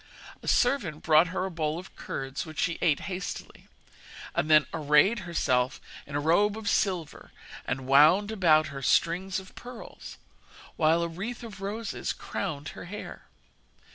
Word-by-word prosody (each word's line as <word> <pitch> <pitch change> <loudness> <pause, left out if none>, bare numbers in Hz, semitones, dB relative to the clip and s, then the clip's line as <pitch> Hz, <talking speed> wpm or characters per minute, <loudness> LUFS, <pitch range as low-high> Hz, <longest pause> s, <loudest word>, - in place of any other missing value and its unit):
A - - -11
servant 205 - +1
brought 155 +2 +5
her 185 +2 -2
a 190 - -4
bowl 155 -2 -2
of 185 +2 -10
curds, 135 0 -5
which 155 -2 -11
she 170 - 0
ate 155 -5 +2
hastily, 185 -1 -6 0.7
and 155 - -1
then 155 -2 +6
arrayed 155 +8 +4
herself 125 -6 +1 0.3
in 140 - -7
a - - +1
robe 200 +8 +2
of 220 -2 -7
silver, 180 -9 -1 0.4
and 130 +1 -2
wound 155 +10 +5
about 155 -8 +4
her 135 - -6
strings 180 +7 +1
of 190 0 -13
pearls, 245 -1 -10 0.6
while 165 +1 +3
a - - 0
wreath 205 +9 -6
of 205 -4 -9
roses 210 +3 -3
crowned 150 -7 -5
her - - -9
hair. 205 +4 -8
170 Hz, 155 wpm, -28 LUFS, 150-195 Hz, 0.7 s, then